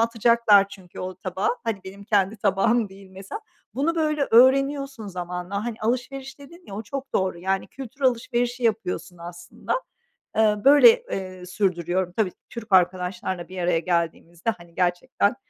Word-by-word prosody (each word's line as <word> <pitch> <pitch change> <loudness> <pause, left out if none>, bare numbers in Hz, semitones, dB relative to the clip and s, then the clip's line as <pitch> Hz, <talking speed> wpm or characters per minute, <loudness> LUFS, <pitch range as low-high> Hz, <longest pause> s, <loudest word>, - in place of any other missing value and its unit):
atacaklar 230 -3 +4
çünkü 190 -3 -11
o 185 0 -5
tabağı, 185 +1 -2
hadi 225 -4 -2
benim 195 +1 -10
kendi 205 0 +1
tabağım 210 +3 +2
değil 195 0 -15
mesela. 190 - -8 0.3
Bunu, 295 +6 0
böyle, 305 -3 +1
öğreniyorsun 270 0 +4
zamanla. 180 +2 -4
Hani, 235 -2 -4
alışveriş 260 +4 -3
dedin 340 +6 -14
ya, 195 - -8
o 210 - -4
çok 270 +5 -6
doğru, 190 -2 0
yani, 190 +2 -1
kültür 270 0 -10
alışverişi 245 -1 0
yapıyorsun 190 -5 -1
aslında. 175 0 -6 0.6
Iıı, 210 -2 +3
böyle, 290 - +9 0.2
eee, 185 -1 -5
sürdürüyorum. 180 -1 -1
Tabii, 205 -5 +1 0.2
Türk 230 -2 -9
arkadaşlarla 180 0 +1
bir 185 - -10
araya 175 -1 +2
geldiğimizde, 170 +2 -2
hani, 170 -1 -17
gerçekten 185 +5 +1
200 Hz, 145 wpm, -24 LUFS, 180-240 Hz, 0.6 s, böyle